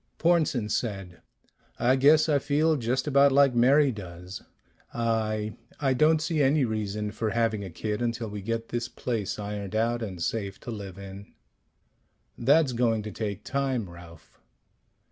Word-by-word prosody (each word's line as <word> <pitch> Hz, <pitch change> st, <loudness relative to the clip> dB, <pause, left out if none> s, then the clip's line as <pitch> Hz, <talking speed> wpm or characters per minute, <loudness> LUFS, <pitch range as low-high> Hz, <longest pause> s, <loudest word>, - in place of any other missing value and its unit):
Pornsen 155 Hz, -9 st, +2 dB
said, 100 Hz, -6 st, -3 dB, 0.6 s
"I 125 Hz, +2 st, +3 dB
guess 150 Hz, +4 st, +5 dB
I 145 Hz, -2 st, +3 dB
feel 150 Hz, +3 st, +2 dB
just 125 Hz, -1 st, -1 dB
about 140 Hz, -1 st, +5 dB
like 140 Hz, -1 st, +5 dB
Mary 135 Hz, +4 st, +4 dB
does. 90 Hz, -3 st, -9 dB, 0.5 s
I 110 Hz, -2 st, -1 dB, 0.3 s
I 135 Hz, -2 st, +2 dB
don't 155 Hz, +4 st, +3 dB
see 155 Hz, -2 st, 0 dB
any 140 Hz, 0 st, +3 dB
reason 105 Hz, -1 st, -3 dB
for 110 Hz, +1 st, -2 dB
having 110 Hz, -2 st, 0 dB
a 95 Hz, -, -6 dB
kid 105 Hz, +6 st, -4 dB
until 115 Hz, -1 st, -2 dB
we 105 Hz, -1 st, -6 dB
get 115 Hz, +2 st, -3 dB
this 120 Hz, 0 st, -3 dB
place 115 Hz, -6 st, -3 dB
ironed 105 Hz, -1 st, -5 dB
out 115 Hz, +2 st, +1 dB
and 95 Hz, -6 st, -5 dB
safe 100 Hz, +2 st, -3 dB
to 120 Hz, -, -6 dB
live 100 Hz, -4 st, -7 dB
in." 100 Hz, 0 st, -10 dB, 1.0 s
"That's 140 Hz, +2 st, +3 dB
going 115 Hz, -2 st, +1 dB
to 105 Hz, -, -6 dB
take 105 Hz, -2 st, -4 dB
time, 135 Hz, -6 st, -1 dB
Ralph." 85 Hz, -2 st, -15 dB
115 Hz, 155 wpm, -27 LUFS, 105-135 Hz, 1.0 s, guess